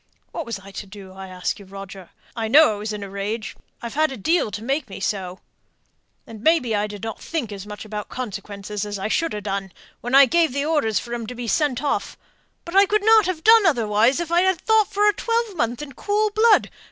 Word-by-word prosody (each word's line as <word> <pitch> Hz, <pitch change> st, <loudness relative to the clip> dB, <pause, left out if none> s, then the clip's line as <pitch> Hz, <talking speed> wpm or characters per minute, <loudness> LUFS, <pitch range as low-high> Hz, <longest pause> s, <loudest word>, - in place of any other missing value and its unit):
"What -, -, -5 dB
was 230 Hz, -3 st, -3 dB
I 195 Hz, 0 st, -13 dB
to 200 Hz, -, -7 dB
do, 195 Hz, -1 st, -11 dB
I 190 Hz, 0 st, -9 dB
ask 185 Hz, +1 st, -4 dB
you, 200 Hz, -, -12 dB
Roger? 195 Hz, -1 st, -10 dB, 0.3 s
I 225 Hz, -2 st, -2 dB
know 295 Hz, +3 st, +6 dB
I -, -, -6 dB
was 210 Hz, +1 st, -4 dB
in 210 Hz, -1 st, -5 dB
a -, -, -6 dB
rage 210 Hz, +3 st, -4 dB, 0.3 s
I've 235 Hz, -, -5 dB
had 310 Hz, 0 st, +2 dB
a 265 Hz, -, -6 dB
deal 320 Hz, -, +1 dB
to 210 Hz, +1 st, -6 dB
make 270 Hz, 0 st, -2 dB
me -, -, -8 dB
so 190 Hz, -2 st, -3 dB, 0.8 s
and 220 Hz, -2 st, -11 dB
maybe 315 Hz, -6 st, +2 dB
I 205 Hz, 0 st, 0 dB
didn't 210 Hz, +1 st, -6 dB
think 295 Hz, -10 st, -4 dB
as 200 Hz, 0 st, -8 dB
much 210 Hz, +1 st, -8 dB
about 210 Hz, -1 st, -6 dB
consequences 210 Hz, -3 st, -5 dB
as 205 Hz, -1 st, -4 dB
I 195 Hz, +2 st, -3 dB
should 330 Hz, +2 st, 0 dB
ha' 210 Hz, -, -5 dB
done, 195 Hz, -1 st, -3 dB, 0.3 s
when 245 Hz, +2 st, -1 dB
I 275 Hz, 0 st, +9 dB
gave 320 Hz, 0 st, +2 dB
orders 280 Hz, -7 st, +1 dB
for 240 Hz, -, -4 dB
'em 235 Hz, -2 st, -4 dB
to 250 Hz, -, -7 dB
be 240 Hz, 0 st, -5 dB
sent 265 Hz, 0 st, 0 dB
off; 285 Hz, -, -2 dB, 0.5 s
but 340 Hz, +2 st, -7 dB
I 395 Hz, 0 st, +6 dB
couldn't 430 Hz, +1 st, +4 dB
have 340 Hz, -4 st, -3 dB
done 445 Hz, -3 st, +7 dB
otherwise 230 Hz, -2 st, +2 dB
if 340 Hz, -1 st, -4 dB
I'd 360 Hz, +2 st, +4 dB
ha' 370 Hz, -, -6 dB
thought 440 Hz, +3 st, +3 dB
for 415 Hz, +1 st, +2 dB
a 415 Hz, -, +4 dB
twelvemonth 390 Hz, -, -1 dB
in 285 Hz, -, -9 dB
cool 420 Hz, +8 st, 0 dB
blood. 435 Hz, 0 st, +4 dB
235 Hz, 225 wpm, -22 LUFS, 205-330 Hz, 0.8 s, I